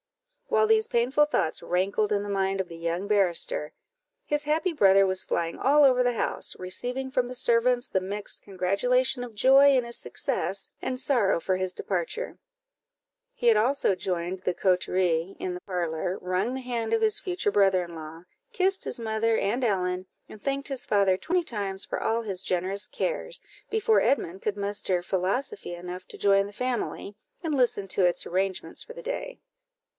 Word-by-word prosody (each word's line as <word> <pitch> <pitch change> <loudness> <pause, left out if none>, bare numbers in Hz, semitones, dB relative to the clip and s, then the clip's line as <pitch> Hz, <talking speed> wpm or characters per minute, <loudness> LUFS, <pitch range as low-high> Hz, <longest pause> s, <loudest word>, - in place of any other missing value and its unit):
While 440 -2 +3
these 440 0 +4
painful 255 +5 +3
thoughts 165 - 0
rankled 200 +4 0
in 205 -1 +1
the 205 - -6
mind 195 -1 0
of 190 - -1
the 170 - -10
young 170 +3 -3
barrister, 205 - +1 0.5
his 295 0 -1
happy 315 +4 0
brother 195 -7 +5
was 185 0 +1
flying 165 0 -2
all 290 +3 +4
over 255 -2 +5
the 245 - +2
house, 230 - -2
receiving 250 +8 -3
from 255 -2 +1
the 250 - -7
servants 245 +1 +2
the 190 - 0
mixed 200 +2 -2
congratulation 245 +7 +1
of 235 -3 -9
joy 270 +4 +6
in 250 - +1
his 235 0 -4
success - - -2
and 255 -1 -2
sorrow 240 -10 +2
for 185 +2 0
his 185 0 -1
departure; 190 - -3 1.0
he 240 - -1
had 230 - +7
also 235 -1 +2
joined 180 0 -3
the 180 -1 -2
coterie 180 -1 +1
in 185 - -3
the 180 - -7
parlour, 175 0 -2
wrung 185 +7 -1
the 265 - -4
hand 240 -3 -3
of 450 - +2
his 430 -1 +2
future 370 +2 -1
brother 195 - +3
in 170 -1 -11
law, 160 +1 -9 0.3
kissed 385 -3 +1
his - - -1
mother 225 0 0
and 235 +6 0
Ellen, 185 -4 0 0.2
and 215 - -12
thanked 275 0 -2
his 270 -3 -1
father 200 -2 +3
twenty 350 - 0
times 200 - -2
for - - -4
all 230 +1 0
his 195 -4 -2
generous 190 +3 -1
cares, - - -2 0.3
before 440 0 +3
Edmund 190 -9 0
could 210 -1 -2
muster 200 -3 -1
philosophy 190 - -2
enough 180 +1 -8
to - - -10
join 195 0 +3
the - - -10
family, 240 -3 -3 0.3
and 315 -3 -1
listen 240 -6 +2
to 185 - +1
its 175 -1 +2
arrangements 190 +1 -2
for 480 - -10
the - - -10
day. - - -5
205 Hz, 180 wpm, -27 LUFS, 185-265 Hz, 1.0 s, had